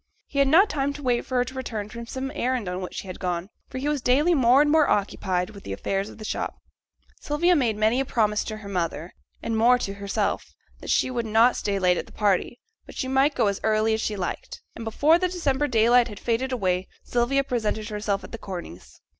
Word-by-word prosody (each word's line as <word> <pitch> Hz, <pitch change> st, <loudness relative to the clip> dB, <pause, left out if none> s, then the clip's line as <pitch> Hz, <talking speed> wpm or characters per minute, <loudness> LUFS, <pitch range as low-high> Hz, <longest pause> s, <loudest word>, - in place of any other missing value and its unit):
He 280 Hz, -, -3 dB
had 275 Hz, -, +5 dB
not 345 Hz, +9 st, +6 dB
time 285 Hz, -5 st, -1 dB
to 290 Hz, 0 st, -9 dB
wait 245 Hz, -2 st, 0 dB
for 255 Hz, -, -4 dB
her 245 Hz, 0 st, +3 dB
return 230 Hz, -6 st, -4 dB
from 235 Hz, +2 st, -8 dB
some 265 Hz, +2 st, -4 dB
errand 255 Hz, -7 st, -1 dB
on 180 Hz, +1 st, -3 dB
which 185 Hz, -, -6 dB
she -, -, -5 dB
had 185 Hz, -1 st, -8 dB
gone, 180 Hz, +1 st, -3 dB, 0.2 s
for 260 Hz, -, -6 dB
he 270 Hz, +3 st, -2 dB
was 295 Hz, -2 st, 0 dB
daily 285 Hz, +8 st, +3 dB
more 260 Hz, -3 st, +5 dB
and 295 Hz, 0 st, +4 dB
more 310 Hz, -1 st, +4 dB
occupied 190 Hz, -1 st, 0 dB
with 200 Hz, -2 st, -12 dB
the 95 Hz, -, -5 dB
affairs 195 Hz, -, -2 dB
of -, -, -12 dB
the 215 Hz, -, -8 dB
shop. -, -, -3 dB, 0.6 s
Sylvia 345 Hz, +5 st, +2 dB
made 235 Hz, -8 st, +1 dB
many 220 Hz, +4 st, +2 dB
a -, -, +2 dB
promise 210 Hz, -5 st, +1 dB
to 215 Hz, -, -5 dB
her 210 Hz, -2 st, -10 dB
mother, 175 Hz, -3 st, -3 dB, 0.3 s
and 225 Hz, -, -1 dB
more 240 Hz, +3 st, +5 dB
to 195 Hz, -5 st, -4 dB
herself, 200 Hz, 0 st, -2 dB, 0.2 s
that -, -, -9 dB
she 255 Hz, -, +2 dB
would 235 Hz, -2 st, -2 dB
not 225 Hz, +3 st, +4 dB
stay 200 Hz, -1 st, -1 dB
late 180 Hz, -2 st, +3 dB
at -, -, -4 dB
the -, -, -16 dB
party, 205 Hz, +3 st, 0 dB, 0.3 s
but -, -, -12 dB
she 260 Hz, -, -2 dB
might 270 Hz, +3 st, +2 dB
go -, -, +2 dB
as 200 Hz, -1 st, 0 dB
early 220 Hz, 0 st, +2 dB
as 220 Hz, -, -1 dB
she 215 Hz, -, -2 dB
liked; 185 Hz, -3 st, -5 dB
and 230 Hz, -, -7 dB
before 295 Hz, +9 st, +3 dB
the 365 Hz, -, +1 dB
December 295 Hz, -5 st, 0 dB
daylight 240 Hz, 0 st, +4 dB
had 205 Hz, -4 st, -9 dB
faded 245 Hz, +3 st, -1 dB
away, 185 Hz, -6 st, 0 dB, 0.2 s
Sylvia 245 Hz, +3 st, +1 dB
presented 220 Hz, -4 st, -2 dB
herself 205 Hz, -2 st, -2 dB
at -, -, -10 dB
the 230 Hz, -, -7 dB
Corneys'. 175 Hz, -, -9 dB
230 Hz, 235 wpm, -25 LUFS, 200-265 Hz, 0.6 s, not